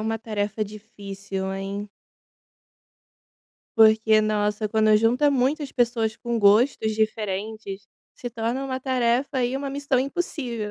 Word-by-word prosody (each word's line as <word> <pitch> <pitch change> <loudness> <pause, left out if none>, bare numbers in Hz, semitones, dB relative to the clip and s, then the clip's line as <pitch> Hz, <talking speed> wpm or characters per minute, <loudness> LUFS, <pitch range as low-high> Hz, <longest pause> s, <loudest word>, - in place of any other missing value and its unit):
uma 225 +1 -2
tarefa 215 -1 -2
difícil, 200 -2 -7
hein? 195 +2 -5 1.9
Porque, 220 0 +5
nossa, 210 0 0
quando 215 0 +3
junta 245 +7 +3
muitas 275 +2 0
pessoas 230 -3 0
com 235 -1 -3
gostos 220 +2 +3
diferentes, 210 -1 -3 0.3
se 245 - -7
torna 235 +3 -2
uma 260 -1 -3
tarefa 255 0 0
aí, 250 0 0
uma 275 +1 -3
missão 280 -1 -1
impossível. 260 -7 -3
220 Hz, 120 wpm, -24 LUFS, 210-250 Hz, 1.9 s, Porque